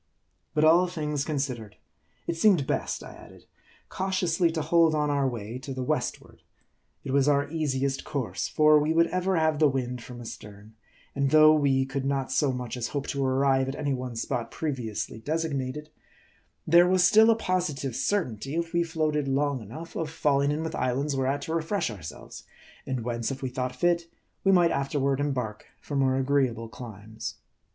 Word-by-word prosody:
But 150 - +3
all 170 +3 +6
things 150 -5 -2
considered, 130 -9 -3 0.5
it 170 - -2
seemed 170 -4 +4
best, - - -2
I - - -10
added, - - -15 0.4
cau 190 - -3
tiously 175 -2 +1
to 160 - -1
hold 165 -1 +4
on 150 -1 +1
our 140 -1 +1
way 115 0 -6
to 135 0 -7
the 130 - -3
westward. - - -3 0.6
It - - -4
was 140 0 +3
our 145 -1 +3
easiest 140 -4 -1
course; 140 -6 -3
for 155 0 +5
we 150 +2 +1
would 165 +1 +5
ever 185 +1 0
have 160 -2 +2
the 155 -2 +5
wind 125 -2 -3
from 120 +1 -10
astern; 105 -2 -10 0.4
and 140 0 +1
though 155 +1 +7
we 135 -3 +2
could 135 0 -3
not 135 -1 -1
so 145 -3 +2
much 125 -2 -4
as 120 -1 -2
hope 140 -1 -3
to 140 -1 -1
arrive 135 0 +2
at 135 - -4
any 140 -1 -1
one 125 -2 -4
spot 115 0 -3
previously 120 -7 -4
designated, 150 0 -3 0.7
there 175 +2 +6
was 185 -1 +4
still 220 +4 +6
a 225 - +4
posi 180 -8 -1
tive 130 -4 -4
certainty, 135 - -1
if 170 0 -2
we 170 - +3
floated 155 -3 -1
long 140 -1 0
enough, 155 +11 -9
of 160 -2 -2
falling 145 -3 +1
in 150 +2 -1
with 160 - -4
islands 135 +3 -1
whereat 135 +2 0
to 160 - -4
refresh 165 - -1
ourselves; 90 -7 -9 0.5
and 130 -3 -2
whence, 115 -1 -2
if 135 0 -6
we 130 - -1
thought 125 0 -3
fit, 170 +3 +1 0.4
we 195 - +4
might 175 -3 +5
afterward 140 -1 0
embark 125 -7 -3
for 145 - -6
more 135 -1 +2
agreeable 130 -4 +1
climes. 110 -2 -8
140 Hz, 185 wpm, -27 LUFS, 130-160 Hz, 0.7 s, though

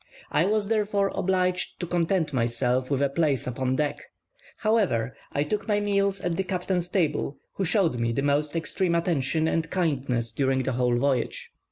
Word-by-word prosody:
I 165 - +3
was, 210 -1 +1
therefore, 205 -2 +1
obliged 185 -1 0
to 175 - -2
content 170 -2 0
myself 125 +1 0
with 140 -1 +1
a 140 - +2
place 140 -3 +1
upon 130 +1 -1
deck; 150 +1 -1 0.6
however, 190 - +1 0.2
I 145 - +1
took 205 +10 -3
my 205 -1 +2
meals 200 -1 +1
at 175 -1 -1
the 190 - +1
captain's 180 -1 -2
table, 150 -6 0 0.2
who 195 - -1
showed 175 - +2
me 115 0 +1
the 135 +4 -1
most 145 +2 +1
extreme 170 +1 0
attention 160 -2 +1
and 165 0 0
kindness 135 -10 0
during 135 -1 +1
the 130 - -1
whole 125 -1 +1
voyage. 130 -1 -1
160 Hz, 175 wpm, -26 LUFS, 130-185 Hz, 0.6 s, I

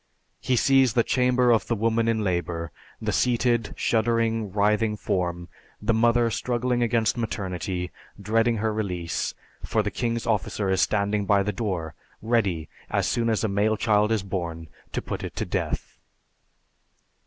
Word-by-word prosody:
He 130 - 0
sees 135 -1 +4
the 120 - +3
chamber 125 0 +3
of 110 -5 +2
the 120 - +1
woman 115 +1 +1
in 110 -2 +1
labor, 85 -3 -2 0.3
the - - -2
seated, 120 -2 +1
shuddering, 115 -2 +1
writhing 105 +2 +1
form, 85 -3 -2 0.3
the 110 +2 +1
mother 115 +1 +3
struggling 125 +1 0
against 115 -1 +1
maternity, 90 -4 -3 0.3
dreading 115 +3 +1
her 110 +1 0
release, 90 -6 -2 0.3
for 110 - 0
the 105 - -2
king's 115 -1 -2
officer 105 -2 0
is 95 -1 +2
standing 100 +1 +1
by 100 -1 +4
the 105 +1 -2
door, 90 -8 -3 0.3
ready, 100 -9 0 0.2
as - - +1
soon 115 -1 +1
as 110 -1 +1
a - - +2
male 105 +2 +1
child 105 0 +2
is 110 -4 +1
born, 85 -4 -4 0.2
to - - -3
put - - -5
it - - -6
to - - -2
death. - - -3
110 Hz, 155 wpm, -25 LUFS, 95-115 Hz, 0.3 s, sees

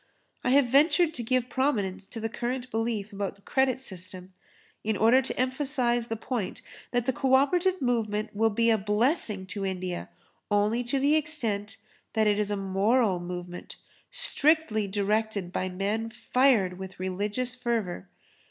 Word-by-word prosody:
I - - +1
have 275 +1 +5
ventured 310 +6 +4
to 250 - -4
give 250 +1 0
prominence 205 -9 -1
to 230 - -7
the 225 - -2
current 245 +2 -4
belief 225 -2 -2
about 200 0 -5
credit 265 -1 +1
system 185 -5 -7 0.5
in 215 -1 0
order 235 +6 +5
to 260 - -5
emphasise 255 -2 +1
the 225 - -2
point 225 -3 -4 0.3
that 245 -1 0
the 260 - +1
co 265 +1 +3
operative 355 +7 +2
movement 220 -4 -1
will 225 +2 +3
be 230 +2 +2
a 220 - +3
blessing 210 - +1
to 200 -2 -4
India 185 -2 -3 0.4
only 210 +3 +2
to 245 +4 0
the 280 +2 +3
extent 235 -10 0 0.4
that 220 -1 +2
it 210 0 +2
is 210 -1 0
a 205 - -1
moral 195 +1 +2
movement 175 0 -7 0.3
strictly 310 - +2
directed 205 -1 -1
by 185 - -1
men 205 +5 -2
fired 225 -7 +2
with 190 -1 -8
religious 205 +7 -1
fervour. 230 -7 -3
225 Hz, 155 wpm, -27 LUFS, 200-255 Hz, 0.5 s, have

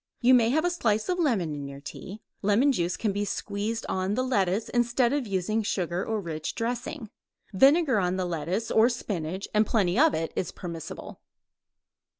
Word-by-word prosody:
You 255 +1 +5
may 235 -2 +5
have 315 +6 +2
a 355 - +2
slice 220 - 0
of 360 0 0
lemon 215 - +1
in 145 -1 -5
your 140 0 -9
tea. 185 +8 -9 0.2
Lemon 210 +8 +3
juice 175 -7 -1
can 215 - 0
be 205 +1 -1
squeezed 205 +2 -3
on 190 +2 -1
the 255 - 0
lettuce 205 -4 0
instead 240 +1 +2
of 285 -5 -1
using 200 +3 0
sugar 180 -3 -2
or 220 -1 -2
rich 160 -5 -5
dressing. 240 +1 -4 0.4
Vinegar 270 - +5
on 180 -1 0
the 185 -1 -1
lettuce 175 +6 -2
or 225 +2 +5
spinach, 190 -6 -4
and 215 0 +4
plenty 200 -1 +1
of 315 0 +5
it, 165 0 -3
is 185 - -2
permissible. 170 -3 -8
210 Hz, 180 wpm, -27 LUFS, 180-240 Hz, 0.4 s, You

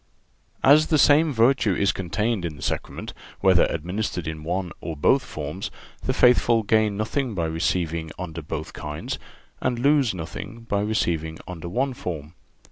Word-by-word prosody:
(382) 140 - +7
As 155 +1 +3
the 155 - +3
same 150 +2 +5
virtue 115 -4 +3
is 100 0 +2
contained 105 +3 -1
in 85 -3 -3
the 70 - -10
Sacrament, - - -3 0.3
whether 95 -2 +5
administered 90 +1 -3
in 80 -1 -5
one 90 +2 -2
or 80 -3 -5
both 70 - +3
forms, - - -5 0.3
the - - 0
faithful 120 -2 +4
gain 105 -1 +2
nothing 115 +2 -1
by 85 -3 0
receiving 80 0 -1
under 85 -3 -5
both 80 0 -5
kinds, 75 0 -5 0.4
and 125 -2 0
lose 140 -4 +3
nothing 90 +7 -7
by 100 -3 -1
receiving 85 -7 -1
under 85 -1 -6
one 130 +8 0
form. 80 -8 -6
95 Hz, 160 wpm, -24 LUFS, 80-115 Hz, 0.4 s, 382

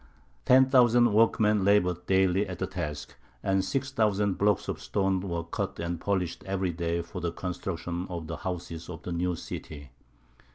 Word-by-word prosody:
Ten 130 +1 +6
thousand 120 -3 +5
workmen 105 -2 +3
laboured 90 -3 +2
daily 95 +1 +3
at 90 -2 -6
the - - -1
task, 75 -1 -5 0.3
and 95 -1 +2
six 135 +7 -2
thousand 105 -5 +1
blocks 105 -1 +2
of - - -4
stone 95 -1 0
were 85 -3 -3
cut 85 - -4
and 85 0 -3
polished 95 -4 -1
every 95 -2 -1
day 85 0 -2
for 85 - -7
the 85 - -1
construction 90 0 -4
of 85 -3 -5
the 80 +1 -5
houses 85 -2 -5
of 80 -3 -8
the 90 - -5
new 90 +1 0
city. 70 -4 -8
90 Hz, 170 wpm, -28 LUFS, 85-100 Hz, 0.3 s, Ten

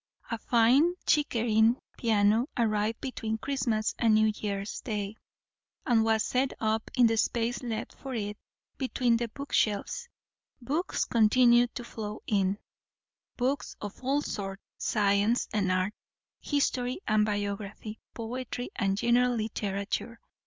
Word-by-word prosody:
A 230 - -2
fine 255 +11 +4
Chickering 230 -6 +3 0.2
piano 220 +1 +3
arrived 220 -1 +1
between 225 -4 -3
Christmas 230 -4 -1
and 225 -2 +4
New 215 0 +4
Year's 200 -1 -4
day, 210 -2 -3 0.7
and 230 -3 +4
was 220 -1 +2
set 260 +1 0
up 220 0 0
in 250 -2 +6
the 225 0 +3
space 235 +2 0
left 230 -3 -4
for 265 -2 -7
it 205 -2 -3 0.4
between 250 -3 +2
the 235 0 -2
bookshelves. 275 - -1 0.5
Books 295 +8 -1
continued 240 +1 +4
to 245 - -4
flow 215 -2 -6
in; 195 -1 +1 0.8
books 260 +3 -1
of 205 +4 -8
all 280 +3 +1
sorts 195 -1 -5 0.2
science 205 +2 +2
and 200 -3 +1
art, 185 +2 +1 0.5
history 255 -3 0
and 215 -1 +4
biography, 205 +1 -3 0.2
poetry 245 +1 -5
and 195 -2 +1
general 245 +2 +3
literature. 215 +1 -3
225 Hz, 125 wpm, -29 LUFS, 210-245 Hz, 0.8 s, in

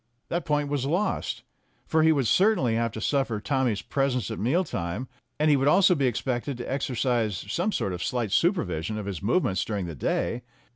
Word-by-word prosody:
That 170 -1 -2
point 150 -2 +1
was 140 -2 -1
lost, 180 +8 -1 0.4
for 160 - +2
he 160 0 +5
would 140 -5 +1
certainly 180 - +3
have 115 0 0
to - - -5
suffer 135 -5 0
Tommy's 125 -2 0
presence 130 -4 -1
at 110 - -4
meal 135 - +2
times, 85 - -4 0.3
and 155 0 +4
he - - +6
would 135 0 +1
also 185 +4 +6
be 140 -6 +1
expected 125 +2 -2
to 120 - -5
exercise 120 -6 -1
some 185 +5 0
sort 95 - -1
of 90 - -4
slight 120 -5 -1
supervision 110 - 0
of 105 - -4
his 100 -4 -5
movements 100 - +1
during 100 -4 -3
the 85 - -5
day. 115 - -1
130 Hz, 195 wpm, -26 LUFS, 110-150 Hz, 0.4 s, he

